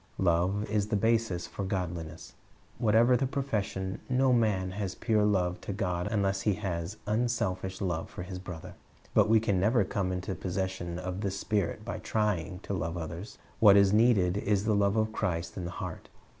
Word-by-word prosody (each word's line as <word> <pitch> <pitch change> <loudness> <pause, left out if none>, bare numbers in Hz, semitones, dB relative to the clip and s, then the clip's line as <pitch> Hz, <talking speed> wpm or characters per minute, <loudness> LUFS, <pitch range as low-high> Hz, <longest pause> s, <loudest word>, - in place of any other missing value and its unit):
Love 95 +4 +2
is 105 -1 0
the 105 - 0
basis 110 -4 +1
of 100 - -1
godliness. 85 -4 -4 0.5
Whatever 115 +3 +5
the 130 +2 +1
profession, 105 -9 -2
no 130 0 +3
man 105 -6 +1
has 95 -1 -4
pure 110 -3 +1
love 90 -4 +1
to - - -5
God 90 -2 -1
unless 100 -2 0
he 105 -2 +1
has 95 -1 -4
unselfish 105 -4 -1
love 85 -4 -2
for - - -7
his 90 0 -6
brother. 90 -3 -8 0.4
But - - +4
we 110 0 +6
can 105 -4 +1
never 105 +4 +3
come 95 -1 -2
into 90 +1 -3
possession 95 -2 -3
of 90 +1 -4
this 100 -2 -2
spirit 110 +2 -1
by 115 - -4
trying 95 -4 -1
to - - -4
love 85 -2 -2
others. 85 +5 -6 0.2
What 100 -2 +8
is 100 0 +5
needed 105 -5 +4
is 100 0 +1
the 110 - +2
love 100 0 +2
of 110 0 +1
Christ 85 -3 -2
in 90 - -4
the - - -3
heart. 90 - -7
100 Hz, 185 wpm, -30 LUFS, 90-110 Hz, 0.5 s, What